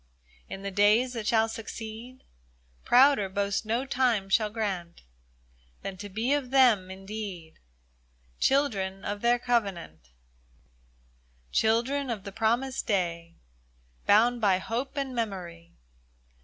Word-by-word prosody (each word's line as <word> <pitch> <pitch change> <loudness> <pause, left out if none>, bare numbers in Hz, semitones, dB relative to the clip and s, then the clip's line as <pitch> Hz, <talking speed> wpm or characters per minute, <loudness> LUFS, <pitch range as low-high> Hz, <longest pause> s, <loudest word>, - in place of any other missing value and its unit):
In 195 - -7
the 200 - -4
days 210 +6 +3
that 225 -3 -4
shall 225 0 +3
succeed, 225 +3 -8 0.6
Prouder 250 -6 +5
boast 200 +2 -2
no 235 +4 0
time 245 -7 +1
shall 210 +2 +2
grant 195 -6 -4 0.8
Than 195 - -5
to 205 +2 -8
be 225 +7 0
of 285 -3 -1
them, 245 -8 +4
indeed, 195 -3 -8 0.8
Children 200 -9 0
of 205 0 -4
their 240 +1 +3
Covenant: 195 - -2 1.4
Children 245 +5 +1
of 220 -5 -4
the 200 - -7
promised 235 +5 -1
day, 170 -4 -1 0.7
Bound 235 +3 +4
by 195 -3 +4
hope 240 +8 -4
and 275 -2 -2
memory. 180 -7 -5
220 Hz, 115 wpm, -28 LUFS, 195-245 Hz, 1.4 s, Prouder